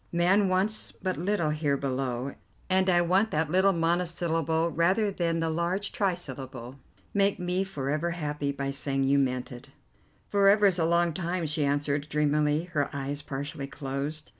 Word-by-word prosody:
'Man 185 +3 +3
wants 195 +4 0
but 185 -1 -3
little 175 -3 0
here 150 -2 0
below,' 130 -1 -2 0.4
and 190 0 +3
I 175 -1 +4
want 190 +5 +2
that 155 -2 -1
little 190 +2 +4
monosyllable 165 -1 0
rather 190 +6 +2
than 170 -3 -1
the 165 - 0
large 175 +5 -1
trisyllable. 135 - -4 0.3
Make 200 0 +2
me 180 +1 -1
for 150 -9 -5
ever 155 +3 0
happy 150 -4 -2
by 140 0 -3
saying 135 0 -1
you 140 +1 +3
meant 130 -2 -1
it." 120 -1 -10 0.6
"For 200 -1 +4
ever 205 +1 +5
is 185 -3 +3
a 165 - +2
long 170 0 +2
time," 175 0 -2
she 155 0 -1
answered 145 +1 0
dreamily, 150 +1 +1
her 145 -3 +1
eyes 140 0 -3
partially 140 -1 -5
closed. 140 +2 -4
160 Hz, 165 wpm, -28 LUFS, 140-180 Hz, 0.6 s, ever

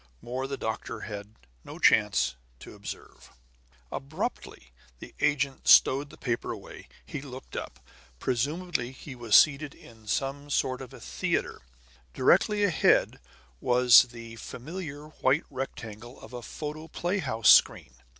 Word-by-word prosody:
More 130 - -4
the 140 0 -4
doctor 110 -2 -4
had 105 0 -8 0.3
no - - -10
chance 100 - +3 0.2
to - - -12
observe. - - -10 0.6
Abruptly 65 -2 -5 0.3
the - - -12
agent 140 -2 0
stowed 140 +2 +6
the - - -14
paper 120 -3 -2
away, - - -10 0.2
and 140 - -6
looked 130 -1 -10
up. - - -6 0.4
Presumably 130 - -2
he 135 +1 -10
was 120 -4 +1
seated 150 -1 +5
in 110 -2 -17
some 140 +5 -2
sort 130 -2 0
of 130 - -9
a - - -12
theater. - - -2 0.5
Directly 205 +9 +3
ahead 200 -5 +3 0.4
was 125 - +7
the 115 -1 -10
familiar 150 +3 -7
white 145 -1 +1
rectangle 120 -3 -7
of 110 - -13
a 120 - -6
photoplay 160 - -4
house 115 - +4
screen. 65 - +4
130 Hz, 130 wpm, -28 LUFS, 115-145 Hz, 0.6 s, was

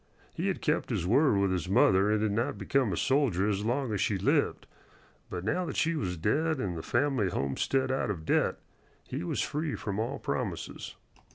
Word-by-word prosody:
He - - -2
had - - -2
kept - - 0
his - - -1
word 120 - +4
with 100 -1 +2
his 90 -1 -2
mother 100 -2 +4
and 105 0 +2
had 110 - +1
not 115 +4 -1
become 135 -6 +1
a 85 - -2
soldier 130 -9 +2
as 105 -1 0
long 120 +1 -1
as 100 - -1
she 105 -1 +1
lived; 95 - +1 0.6
but 90 - -5
now 175 +11 0
that - - -5
she 165 +1 +2
was 90 - -2
dead 150 - +1
and 95 -7 -2
the 80 - -4
family 120 - +1
homestead 130 - 0
out 130 -3 0
of 85 -6 -4
debt, - - +2 0.5
he - - -4
was 90 - -1
free 150 0 -2
from 100 -1 -4
all 125 +6 -2
promises. - - -4
105 Hz, 200 wpm, -29 LUFS, 95-135 Hz, 0.6 s, word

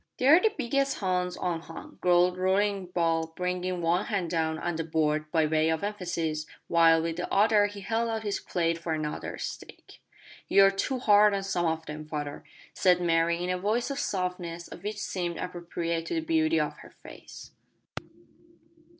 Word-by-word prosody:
"They're 285 +7 +6
the 440 - +3
biggest 275 +1 0
hounds 180 -2 -1
unhung," 165 -2 -5
growled 180 0 +4
Roaring 190 +1 +1
Bull, 165 -2 0
bringing 180 0 -2
one 175 +5 +1
hand 195 -7 -2
down 160 -2 0
on 175 +1 -3
the 165 - -1
board 155 -1 0
by 160 -2 +3
way 155 +1 +2
of 160 +2 -1
emphasis, 170 -7 -3 0.2
while 165 -1 +5
with 165 0 -3
the 180 - -4
other 205 0 +4
he 205 0 -9
held 225 +4 -1
out 220 -1 -3
his 205 -2 -2
plate 165 -1 -1
for 165 -1 -3
another 155 -1 -4
steak. - - -9 0.5
"You're 195 0 +6
too 195 +7 -2
hard 210 -3 +5
on 195 - -2
some 175 -3 0
of 160 0 -2
them, 155 0 -7
father," 145 -1 -5 0.3
said 180 -1 +3
Mary, 170 0 +1
in 180 - -1
a 180 - -1
voice 220 +7 0
the 275 - -3
softness 180 -7 -3
of 175 - -11
which 210 0 -4
seemed 175 -4 -3
appropriate 170 -2 -4
to - - -2
the 325 - 0
beauty 320 0 +2
of - - -2
her - - -13
face. - - -13
180 Hz, 175 wpm, -28 LUFS, 165-205 Hz, 0.5 s, They're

